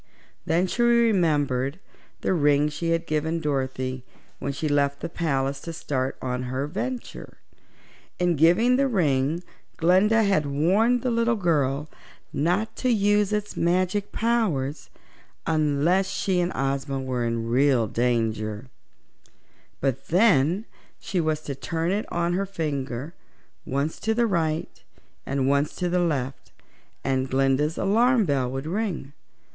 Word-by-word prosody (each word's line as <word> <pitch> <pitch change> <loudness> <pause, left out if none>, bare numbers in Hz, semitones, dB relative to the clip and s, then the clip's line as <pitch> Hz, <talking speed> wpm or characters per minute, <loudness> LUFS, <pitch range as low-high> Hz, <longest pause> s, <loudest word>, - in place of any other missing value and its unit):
Then 170 +2 +2
she 215 +6 -2
remembered 165 - +2 0.4
the - - +1
ring 145 -2 +3
she 155 +3 -3
had 165 0 0
given 160 +2 -1
Dorothy 130 -3 -2 0.4
when 140 - -2
she 150 +3 -3
left 140 -1 +1
the - - -4
palace 140 -5 -1
to 165 - -6
start 130 -4 -2
on 125 -1 -2
her 130 +2 -2
venture. 235 - -5 0.8
In 175 -1 +2
giving 180 - +4
the 275 0 +3
ring 160 - +1 0.3
Glinda 195 +7 +4
had 190 -8 +2
warned 195 +12 +2
the 250 - 0
little 230 0 +2
girl 150 -7 0 0.5
not 180 +9 0
to 255 - 0
use 205 -2 +2
its 210 0 -2
magic 185 +4 0
powers 190 - -1 0.6
unless 160 +4 +2
she 190 -2 0
and 175 +1 0
Ozma 135 0 -1
were 130 -2 -2
in 115 -1 -2
real 125 0 +3
danger, 115 0 -1 1.1
but 135 -1 -1
then 180 0 +3 0.3
she 185 -3 -1
was 155 -1 -1
to 145 - -5
turn 165 +5 -2
it 205 +3 -2
on 170 0 0
her 195 +2 -1
finger 145 -5 -4 0.5
once 140 +4 -2
to 220 +1 0
the 235 +1 +3
right 165 -6 -2 0.4
and 135 -1 0
once 140 +2 +1
to 180 - -1
the 180 +1 +1
left 140 -6 -2 0.5
and 130 -1 0
Glinda's 135 +4 +1
alarm 230 +3 +3
bell 135 -5 0
would 135 +2 -4
ring. 175 -6 -3
155 Hz, 140 wpm, -25 LUFS, 135-190 Hz, 1.1 s, giving